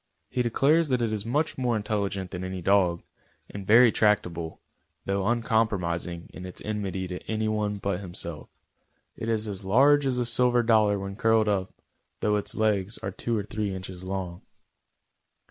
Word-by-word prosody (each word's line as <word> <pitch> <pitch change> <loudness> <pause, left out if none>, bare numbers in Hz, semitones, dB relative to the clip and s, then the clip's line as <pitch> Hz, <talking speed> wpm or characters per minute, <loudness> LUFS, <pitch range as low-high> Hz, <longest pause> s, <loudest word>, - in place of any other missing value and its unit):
He 125 - 0
declares 145 +7 +3
that 125 -2 +1
it 110 -2 0
is 105 0 -3
much 145 +4 0
more 120 -3 +1
intelligent 100 -3 -2
than 90 0 -5
any 95 0 -4
dog, 90 -2 +2 0.5
and 100 -2 -7
very 115 +2 +7
tractable, 90 -7 0 0.5
though 100 0 -1
uncompromising 100 -8 0
in 90 - -9
its 90 -1 -8
enmity 95 -3 -3
to 90 0 -5
any 110 0 0
one 105 -1 -1
but 100 -2 -2
himself. 85 -4 -6 0.7
It 115 - -5
is 110 -1 0
as 100 -2 -5
large 135 +8 +4
as 130 -2 0
a 125 - +1
silver 120 +1 +3
dollar 110 -3 +4
when 100 0 -6
curled 110 -1 +3
up, 95 -2 0 0.5
though 105 0 +1
its 105 - -2
legs 105 -2 +1
are 95 - -2
two 115 +4 -2
or 105 - -1
three 105 -1 -3
inches 95 -1 -7
long. 95 -2 -4
105 Hz, 170 wpm, -27 LUFS, 95-115 Hz, 0.7 s, very